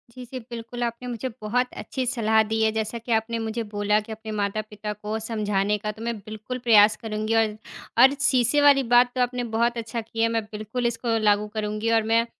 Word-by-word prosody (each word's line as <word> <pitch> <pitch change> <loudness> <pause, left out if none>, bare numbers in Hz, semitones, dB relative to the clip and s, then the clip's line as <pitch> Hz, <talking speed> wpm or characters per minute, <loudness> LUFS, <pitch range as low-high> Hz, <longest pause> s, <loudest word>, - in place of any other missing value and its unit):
जी, 255 -1 -8
जी, 255 +2 -7
बिल्कुल, 235 +1 -6
आपने 235 +1 -3
मुझे 245 +2 -3
बहुत 240 +4 0 0.2
अच्छी 260 - -3
सलाह 220 -2 +3
दी 225 - +1
है। 220 - +4
जैसा 220 +1 -2
कि 235 - -1
आपने 225 +1 0
मुझे 230 +1 -2
बोला 205 +1 +2
कि 220 - -7
अपने 220 0 -7
माता-पिता 210 +1 -3
को 210 +1 -4
समझाने 210 -2 0
का, 210 +1 -3
तो 220 - -11
मैं 235 0 -2
बिल्कुल 215 +5 -7
प्रयास 210 -1 +7
करूँगी। 215 0 -2
और, 220 -2 +2 0.4
और 265 +3 +7
शीशे 260 +1 +3
वाली 280 -1 +6
बात 245 0 +6
तो 255 - -2
आपने 245 0 0
बहुत 235 +1 +2
अच्छा 230 +1 -4
किया, 225 +1 -1
मैं 225 - +1
बिल्कुल 215 +3 -3
इसको 230 0 -1
लागू 205 +1 +3
करूँगी 215 +1 -1
और - - +1
मैं 230 +1 +4
225 Hz, 210 wpm, -24 LUFS, 215-240 Hz, 0.4 s, प्रयास